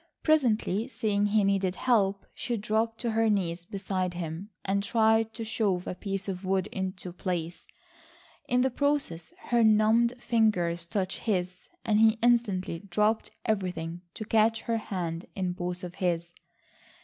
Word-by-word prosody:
Presently 235 - +2
seeing 205 -5 0
he 210 0 +3
needed 195 -2 +1
help 200 -5 +1
she 240 -2 -3
dropped 220 +2 0
to 235 -2 -1
her 225 0 +2
knees 175 -4 0
beside 185 -2 -2
him 170 +3 -5 0.2
and 200 +1 +1
tried 220 +1 +3
to 230 - -4
shove 205 -5 0
a - - -3
piece 195 +1 -4
of 190 -1 -4
wood 190 0 +1
into 185 -2 -4
place. 175 -2 -4 0.8
In 250 0 +2
the 260 +1 +2
process 275 - -1 0.2
her 240 -1 +4
numbed 220 +2 +4
fingers 180 -8 +1
touched 190 +1 -2
his, 180 -4 -2 0.2
and 215 -1 +3
he 220 0 +5
instantly 210 -8 +2
dropped 210 +4 0 0.2
everything 180 -5 -2
to 215 - -5
catch 225 0 +3
her 230 -1 0
hand 175 -6 -4
in 185 -2 -1
both 180 +1 -4
of 180 -1 -6
his. 170 -3 -1
200 Hz, 150 wpm, -28 LUFS, 180-225 Hz, 0.8 s, he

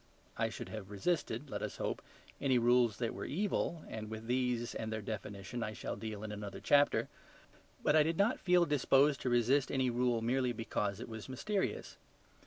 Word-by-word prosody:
I - - 0
should - - -7
have 110 -3 -7
resisted, 130 - -1
let - - -3
us - - -4
hope, - - -2 0.4
any 130 -2 +3
rules 120 -2 +4
that 115 -2 -1
were - - -5
evil, 170 -1 -1
and 110 -1 -6
with 110 0 -6
these 125 -1 0
and 110 0 -4
their 110 - -2
definition 100 +2 -5
I 110 -1 -2
shall 90 - -4
deal 110 -2 -6
in 110 - -4
another 105 -1 -6
chapter. 145 0 +4 0.8
But - - +4
I 155 - +7
did 160 +2 +1
not 205 +5 +3
feel 180 -1 +4
disposed 145 -1 +3
to 125 - 0
resist 125 +3 +3
any 130 -2 +1
rule 120 -1 +1
merely 125 +1 +1
because 105 -3 -2
it - - -6
was 110 +1 -8
mysterious. 195 +10 -2
120 Hz, 190 wpm, -34 LUFS, 110-140 Hz, 0.8 s, I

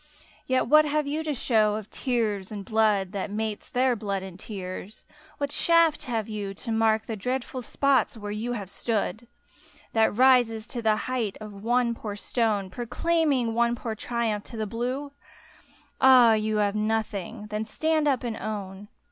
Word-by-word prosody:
Yet 260 0 +2
what 305 +4 +6
have 300 0 0
you 300 +3 -2
to 310 -1 -1
show 215 -4 +2
of 215 -1 -7
tears 220 -7 -1
and 200 -2 -6
blood, 210 -4 +2
That 200 0 -3
mates 215 0 -4
their 250 0 +2
blood 200 -3 -3
and 190 -1 -9
tears? 190 0 -7 0.3
What 285 0 -2
shaft 335 -2 +3
have 230 -4 -2
you, 205 -3 -5
To 230 - -6
mark 220 0 +2
the 225 - -4
dreadful 255 +4 -3
spots 275 0 +1
where 205 -1 -6
you 225 +4 -3
have 205 -5 -5
stood, 225 +1 -2 0.7
That 220 -2 +2
rises 245 -4 +4
to 240 - -4
the 220 -1 +3
height 240 -6 -2
of 215 -1 -8
one 240 0 +2
poor 215 -3 -6
stone 205 -3 -1
Proclaiming 255 - 0
one 235 +1 +2
poor 230 -1 -4
triumph 220 -1 -2
to 230 - -9
the 215 - -1
blue? 250 +6 -3 0.9
Ah, 250 -3 +8
you 215 0 0
have 205 -1 +2
nothing! 215 -2 -2
Then 210 +1 -1
stand 315 +5 0
up 265 -3 +1
and 235 -2 -3
own! 200 -2 -5
225 Hz, 170 wpm, -26 LUFS, 210-250 Hz, 0.9 s, Ah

